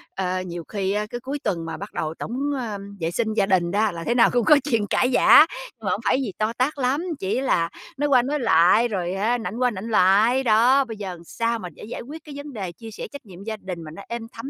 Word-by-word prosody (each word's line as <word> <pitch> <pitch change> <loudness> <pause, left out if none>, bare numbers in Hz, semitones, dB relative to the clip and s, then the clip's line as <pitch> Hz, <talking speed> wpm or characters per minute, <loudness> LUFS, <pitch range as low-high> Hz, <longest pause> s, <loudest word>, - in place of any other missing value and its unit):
ờ, 185 -1 -1
nhiều 175 -2 -6
khi 195 -2 -2
á, 210 +1 0
cứ 240 - -5
cuối 275 +4 -5
tuần 180 - -2
mà 165 -1 -5
bắt 200 +2 -8
đầu 155 0 -2
tổng, 275 +5 -2
ơ, 220 -5 -4 0.2
vệ 165 0 -1
sinh 220 +4 -1
gia 215 - +2
đình 180 -3 +1
đó, 210 +1 +2
là 165 -1 -6
thế 235 - 0
nào 235 - +6
cũng 240 -3 +2
có 300 - +7
chuyện 230 -7 0
cãi 255 +4 +2
vã, - - +8 0.2
nhưng 230 -4 -12
mà 190 - +1
hổng 200 - -1
phải 270 - +2
gì 220 -7 -3
to 215 +2 0
tát 270 +4 0
lắm, 270 +3 0 0.2
chỉ 205 +7 -1
là 170 -11 +1 0.3
nói 290 +2 +1
qua 255 -3 +6
nói 285 +4 -2
lại, 185 - +4
rồi 185 -5 -2
á, 220 +5 +1
nạnh 220 -2 -5
qua 250 0 +2
nạnh 205 +1 -6
lại. 215 +6 +4
Đó, 250 +4 +4
bây 225 -2 -7
giờ 190 -4 -6
sao 230 +5 -1
làm 180 - -7
để - - -12
giải - - -5
quyết 300 +6 -9
cái 295 -3 -10
vấn 285 0 -8
đề 195 -6 -4
chia 225 +6 -11
sẻ - - -7
trách 285 -2 -11
nhiệm 190 -1 -12
gia 220 +1 -4
đình 185 -4 -7
mà 155 - -9
nói 200 +5 -10
êm 235 -1 -5
thắm 235 +5 -7
220 Hz, 275 wpm, -23 LUFS, 190-250 Hz, 0.3 s, vã